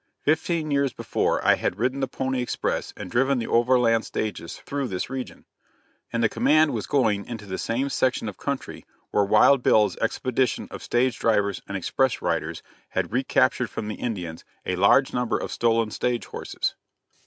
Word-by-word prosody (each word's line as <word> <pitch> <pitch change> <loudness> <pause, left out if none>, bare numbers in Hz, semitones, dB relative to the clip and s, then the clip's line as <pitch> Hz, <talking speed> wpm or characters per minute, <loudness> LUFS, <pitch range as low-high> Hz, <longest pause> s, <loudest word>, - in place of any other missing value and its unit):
Fifteen 155 0 0
years 140 -3 +1
before, - - -1
I - - +7
had 90 - -1
ridden 125 +5 0
the 135 - 0
pony 130 0 -2
express 125 - -2
and 90 - -7
driven 135 +2 +2
the 115 - -2
overland 120 -1 +3
stages 105 -6 -4
through 140 -2 -3
this 95 0 -4
region, 130 -1 -6 0.7
and 115 0 0
the - - +6
command 155 +6 +3
was - - -3
going 110 -8 +2
into 115 -3 -7
the 95 -1 -5
same 125 +4 -1
section 130 -4 0
of 105 - -5
country - - -5 0.3
where 105 - +3
Wild 110 +7 +5
Bill's 105 -3 +3
expedition 125 +1 0
of - - -7
stage 120 0 0
drivers 105 -3 +1
and 100 - -3
express 130 +7 0
riders - - -2 0.3
had - - -2
recaptured - - +2
from 105 - -5
the - - -2
Indians 90 -9 -4 0.2
a 90 - -1
large 100 +9 +4
number 125 -1 0
of - - -5
stolen 115 -2 +1
stage 120 +1 -1
horses. - - -3
120 Hz, 175 wpm, -25 LUFS, 105-130 Hz, 0.7 s, I